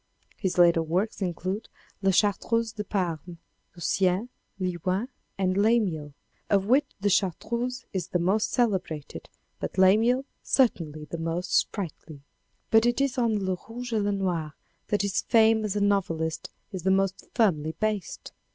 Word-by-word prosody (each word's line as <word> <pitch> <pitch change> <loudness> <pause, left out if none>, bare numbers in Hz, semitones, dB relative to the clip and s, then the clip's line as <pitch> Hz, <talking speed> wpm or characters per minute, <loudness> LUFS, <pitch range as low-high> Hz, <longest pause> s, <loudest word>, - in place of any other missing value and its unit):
His 190 -3 -2
later 170 -1 +6
works 180 +8 -1
included, 185 +3 -3 0.3
La 195 - +3
Chartreuse 220 +4 +2
de 215 -1 -5
Panne, 175 -4 -3 0.4
Lucien, 185 +5 +1 0.3
Leuwen 185 +5 -1 0.3
and 185 -1 +1
Lamiel, 195 -9 +1 0.3
of 195 -1 +3
which 265 +6 +3
the 200 - 0
Chartreuse 235 +7 -1
is 190 -2 -2
the - - 0
most 190 +5 +1
celebrated, 190 - -1 0.3
but - - -5
Lamiel 225 +8 +4 0.2
certainly 160 - +1
the 170 - -6
most 165 +3 -3
sprightly. 160 -7 -2 0.5
But 225 +1 +5
it 240 +1 +1
is 275 -2 0
on 220 -5 +1
Le 185 -1 0
Rouge 240 +1 -6
et 220 - +2
Le 205 0 +1
Noir 175 -6 -2 0.3
that 205 -1 +1
his 200 -1 0
fame 225 -1 +4
as 210 -1 -2
a 205 - 0
novelist 165 -6 0 0.2
is 190 -3 -5
the 190 - +1
most 195 0 +1
firmly 160 -9 +2
based. 215 -5 -2
195 Hz, 150 wpm, -27 LUFS, 175-220 Hz, 0.5 s, later